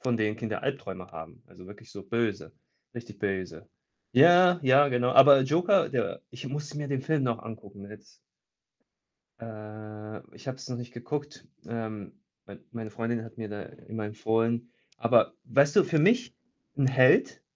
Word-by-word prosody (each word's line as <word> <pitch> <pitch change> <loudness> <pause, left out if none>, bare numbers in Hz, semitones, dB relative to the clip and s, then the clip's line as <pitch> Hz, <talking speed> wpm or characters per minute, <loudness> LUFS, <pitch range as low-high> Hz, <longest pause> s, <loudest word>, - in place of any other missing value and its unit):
von 125 -2 0
denen 110 -1 -1
Kinder 110 -2 -5
Albträume 100 -10 -5
haben. 80 0 -11
Also, 90 - -16
wirklich 105 +4 -14
so 100 - -9
böse, 115 -4 -3 0.4
richtig 115 -4 -10
böse. 95 -3 -4 0.4
Ja, 175 +6 +6
ja, 135 +2 +5
genau. 125 -1 +1
Aber 135 0 +8
Joker, 175 +8 +2
der 125 -3 -2
ich 125 +3 -9
muss 145 +2 -6
mir 150 -1 -5
den 135 -2 -2
Film 155 -1 0
noch 115 -2 -1
angucken 100 -3 -11
jetzt. 105 -1 -15 1.3
Äh, 105 -1 -9 0.2
ich - - -16
habe 130 - -4
es 130 -1 -11
noch 125 - -4
nicht 120 0 -9
geguckt. 145 +5 -6 0.2
Ähm. 110 -3 -6 0.3
Mit - - -16
meine 110 -2 -6
Freundin 115 +1 -3
hat 115 0 -13
mir 110 -2 -6
da 105 -1 -7
immer 110 +3 -9
empfohlen 115 +2 -1 0.2
aber - - +3
weißt 140 +4 +2
du - - +6
für 170 -4 +1
mich 235 +9 +2 0.4
'n 135 -2 +2
Held 130 -1 +4
120 Hz, 165 wpm, -27 LUFS, 105-140 Hz, 1.3 s, Aber